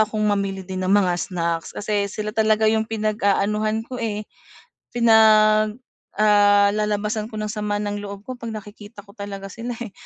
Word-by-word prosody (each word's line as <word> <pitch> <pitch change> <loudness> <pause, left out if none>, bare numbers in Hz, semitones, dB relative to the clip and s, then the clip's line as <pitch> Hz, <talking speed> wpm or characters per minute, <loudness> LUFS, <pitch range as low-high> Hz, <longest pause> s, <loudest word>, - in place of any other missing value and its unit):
akong 215 +1 -4
mamili 195 -2 -1
din 185 0 -4
ng 190 - +1
mga 190 -3 +3
snacks 170 -2 -3
kasi 205 -1 -1
sila 215 0 -4
talaga 220 0 +3
yung 220 0 +1
pinag-aanuhan 215 0 0
ko, 250 -1 -7
eh, 215 -2 -3 0.7
pinag, 215 -2 +5 0.4
ah, 205 -1 +5
lalabasan 210 0 -1
ko 215 - -7
ng 215 - -2
sama 210 -1 -2
ng 205 0 -3
loob 200 0 -8
ko 255 - -5
'pag 235 -2 -7
nakikita 205 0 -10
ko 200 - -17
talaga 200 -1 -7
sila, 240 +3 -5
eh. 225 -5 -6
210 Hz, 165 wpm, -22 LUFS, 200-215 Hz, 0.7 s, pinag